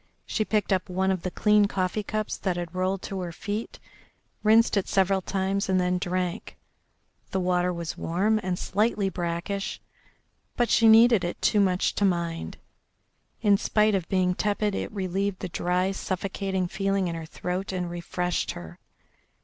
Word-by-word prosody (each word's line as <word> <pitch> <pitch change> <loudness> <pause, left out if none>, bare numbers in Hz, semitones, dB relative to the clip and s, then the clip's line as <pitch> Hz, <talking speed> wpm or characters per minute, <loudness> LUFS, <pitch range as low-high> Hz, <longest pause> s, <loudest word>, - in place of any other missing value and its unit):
She 220 - -1
picked 210 -1 0
up 185 -1 -1
one 190 +1 +1
of 185 -2 -1
the 185 - -2
clean 210 +2 +3
coffee 190 +1 -1
cups 215 +1 -3
that 185 -3 -2
had 175 -1 -5
rolled 185 +1 -1
to 195 - -4
her 175 -2 -4
feet, 210 +5 -5 0.6
rinsed 220 +2 +4
it 200 - 0
several 190 0 +2
times, 195 +1 -1
and 185 -1 +3
then 180 0 +1
drank. 180 -1 -3 0.7
The 190 - -1
water 180 0 +1
was 170 -2 -5
warm 200 +6 +1
and 185 -2 -2
slightly 205 0 0
brackish, 180 +3 -3 0.8
but 240 -2 +2
she 225 - +5
needed 225 -2 +7
it 175 - -3
too 210 - +3
much 185 -2 +2
to - - -1
mind. 170 -3 -1 0.9
In 205 -2 +5
spite 215 +1 +2
of 185 -4 -1
being 185 -1 +2
tepid 210 +1 0
it - - -3
relieved 195 0 -2
the 185 - -5
dry, 180 +2 0
suffocating 190 -1 -2
feeling 195 0 0
in 170 - -2
her 165 -1 -6
throat 180 +4 -4
and 180 -2 -2
refreshed 175 +1 -2
her. 85 0 -10
190 Hz, 165 wpm, -26 LUFS, 180-200 Hz, 0.9 s, needed